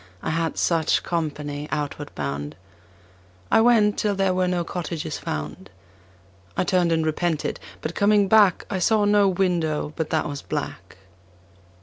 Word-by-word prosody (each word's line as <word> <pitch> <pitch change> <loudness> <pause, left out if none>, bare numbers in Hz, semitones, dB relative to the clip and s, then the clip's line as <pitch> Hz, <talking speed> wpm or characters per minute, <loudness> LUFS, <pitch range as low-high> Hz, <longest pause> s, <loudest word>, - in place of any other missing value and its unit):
I - - -1
had 165 0 -1
such 165 -2 +2
company 150 -3 -3
outward 145 -1 -3
bound. 70 +1 -4 1.0
I - - +6
went 225 -3 +4
till 205 -2 +1
there 195 -1 +1
were 185 0 +1
no 180 -1 0
cottages 165 -2 -4
found. 75 +5 -5 0.9
I - - +2
turned 180 -2 +2
and 160 -1 +1
repented, 160 0 -1 0.2
but 155 - -4
coming 205 0 +3
back 205 -3 +4
I 190 - -2
saw 210 +3 +3
no 205 -1 +4
window 175 -5 0
but 160 -2 -3
that 160 - 0
was 145 -1 -5
black. - - -5
170 Hz, 145 wpm, -24 LUFS, 150-195 Hz, 1.0 s, I